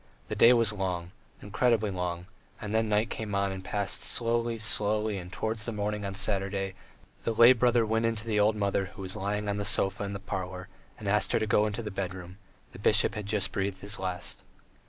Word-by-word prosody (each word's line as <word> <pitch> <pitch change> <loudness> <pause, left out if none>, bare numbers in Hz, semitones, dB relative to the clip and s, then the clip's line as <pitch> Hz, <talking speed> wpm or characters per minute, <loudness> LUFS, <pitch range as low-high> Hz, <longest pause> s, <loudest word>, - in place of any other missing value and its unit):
The - - -2
day 115 - +7
was 115 -3 +5
long, 90 -3 -3 0.3
incredibly 110 0 +1
long, 90 -1 -3 0.3
then 105 - -5
the 110 +1 +3
night 105 0 0
came 105 -3 -4
on 100 0 +1
and 95 -1 -6
passed 100 +1 -2
slowly, 115 0 0
slowly, 105 -1 0
and 90 0 -9
towards 110 +3 -2
morning 105 -1 -2
on 100 0 -4
Saturday 95 -1 -1 0.5
the 115 - 0
lay 120 +3 +8
brother 120 -1 +3
went 115 +1 +1
in 115 - 0
to 110 +1 -7
the 110 -2 0
old 105 +1 +4
mother 100 -1 0
who 100 - -7
was 95 +1 -3
lying 105 +1 -2
on 100 0 -1
the 105 - -2
sofa 100 0 0
in 100 0 -4
the 100 - -4
parlour, 95 -1 -5 0.3
and 105 - -7
asked 105 +1 +3
her - - +3
to 110 - 0
go 105 0 +3
into 105 +2 -4
the 105 - -5
bedroom: 95 -1 -6 0.3
the - - -12
bishop - - +4
had 105 -2 -5
just 105 -2 0
breathed 95 -1 -2
his 105 +4 -4
last. 90 -2 -4
105 Hz, 215 wpm, -29 LUFS, 95-110 Hz, 0.5 s, lay